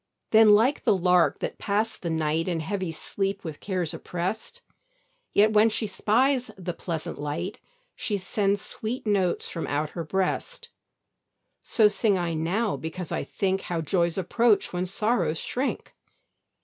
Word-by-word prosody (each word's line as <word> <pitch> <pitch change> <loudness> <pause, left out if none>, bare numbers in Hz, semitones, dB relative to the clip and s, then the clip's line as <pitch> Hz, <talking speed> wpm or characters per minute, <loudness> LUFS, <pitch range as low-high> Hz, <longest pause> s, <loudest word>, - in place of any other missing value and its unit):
Then 220 -1 +7
like 245 +7 +2
the 195 - +3
lark 180 -1 +3
that - - -4
passed 210 +2 0
the 170 - -3
night 160 +1 0
In 170 -3 -1
heavy 185 +1 -3
sleep 195 +4 -3
with 155 -3 -6
cares 180 -5 -2
oppressed; 180 +5 -4 0.7
Yet 215 +2 +4
when 215 +1 +6
she 220 +1 -2
spies 245 +6 +1
the 180 -2 -4
pleasant 165 -3 -5
light, 165 +7 -4 0.4
She 205 - -1
sends 200 +1 0
sweet 230 +3 -5
notes 195 -4 +1
from 165 - -4
out 150 +1 -1
her 170 - -4
breast; 195 - -2 0.9
So 220 -2 +4
sing 205 -1 +2
I 175 -2 -1
now 185 +8 0
because 160 +2 -6
I - - -1
think 190 +6 -1
How 170 -2 -3
joys 170 +2 0
approach 210 +4 +2
when 180 +1 -1
sorrows 190 -5 0
shrink. 260 - -3
190 Hz, 150 wpm, -26 LUFS, 170-215 Hz, 0.9 s, Then